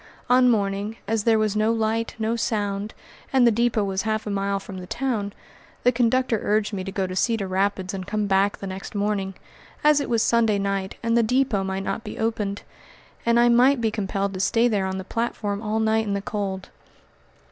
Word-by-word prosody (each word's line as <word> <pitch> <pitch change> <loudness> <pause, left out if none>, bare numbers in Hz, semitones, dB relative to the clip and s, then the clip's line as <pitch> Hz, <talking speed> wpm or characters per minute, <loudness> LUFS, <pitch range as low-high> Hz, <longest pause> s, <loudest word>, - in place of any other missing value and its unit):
On 250 0 +6
arriving, 205 0 -1
as 220 -1 0
there 225 -1 +5
was 215 -1 0
no 215 +1 +2
light, 225 0 -1
no 225 +1 0
sound, 205 -2 -2 0.4
and 260 -2 +4
the 235 - +6
depot 230 -1 +1
was 195 -1 -1
half 220 0 -2
a 210 - -3
mile 200 0 -1
from 195 -1 -8
the 180 - -9
town, 230 -4 -2 0.5
the 245 - +5
conductor 245 -1 +1
urged 210 +1 0
me 190 -2 -3
to 195 - -5
go 190 0 -1
to 185 0 -5
Cedar 225 -1 +1
Rapids 190 0 -1
and 185 -1 -5
come 210 0 -1
back 195 0 +2
the - - -7
next 190 +2 -7
morning, 200 -2 -1 0.5
as 300 -1 +5
it - - -4
was 230 -2 +2
Sunday 225 -3 +3
night 195 -1 -2
and 230 0 +1
the 235 - +5
depot 250 -3 +1
might 190 0 -3
not 225 - -3
be 210 - -7
opened, 210 -3 -2 0.6
and 235 0 +4
I 240 - +5
might 250 +3 +5
be 225 -2 0
compelled 200 -1 -2
to 185 - -5
stay 230 +5 +3
there 200 -5 0
on 190 0 -3
the 190 - -4
platform 210 -1 -2
all 215 0 -1
night 220 0 +1
in 200 - 0
the 200 - -2
cold. 195 -3 -4
210 Hz, 210 wpm, -24 LUFS, 195-230 Hz, 0.6 s, On